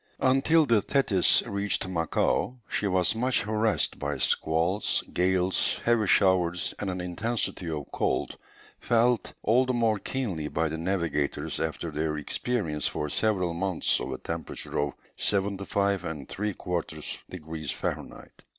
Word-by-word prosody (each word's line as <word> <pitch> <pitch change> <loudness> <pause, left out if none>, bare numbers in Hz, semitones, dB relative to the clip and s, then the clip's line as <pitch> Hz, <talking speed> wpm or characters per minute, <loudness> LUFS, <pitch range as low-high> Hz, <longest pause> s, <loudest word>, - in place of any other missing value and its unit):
Until 135 +5 +4
the 115 -5 +4
Thetis 105 -5 +3
reached 100 -1 -1
Macao, 90 +8 0
she 105 - -1
was 90 -2 +2
much 125 +3 +1
harassed 110 +1 0
by 70 -1 -2
squalls, 80 - +1
gales, 95 +1 +2
heavy 115 -3 +3
showers, 90 -3 +3
and 100 - -2
an 90 0 -3
intensity 90 0 -2
of 75 -3 -3
cold, - - 0 0.4
felt 120 0 +2
all 125 +4 +4
the 130 - +1
more 115 -3 +2
keenly 95 - -3
by 80 +1 0
the 80 - -3
navigators 85 -5 -1
after 80 +1 -2
their 75 0 -1
experience 80 - -1
for 75 - -3
several 95 -6 +1
months 90 0 0
of 65 - -4
a 65 - -3
temperature 85 -1 -4
of 70 -1 0 0.2
75 100 -1 0
3/4 85 0 -4
degrees 80 -4 -6
Fahrenheit. - - -5
95 Hz, 130 wpm, -28 LUFS, 80-110 Hz, 0.4 s, Until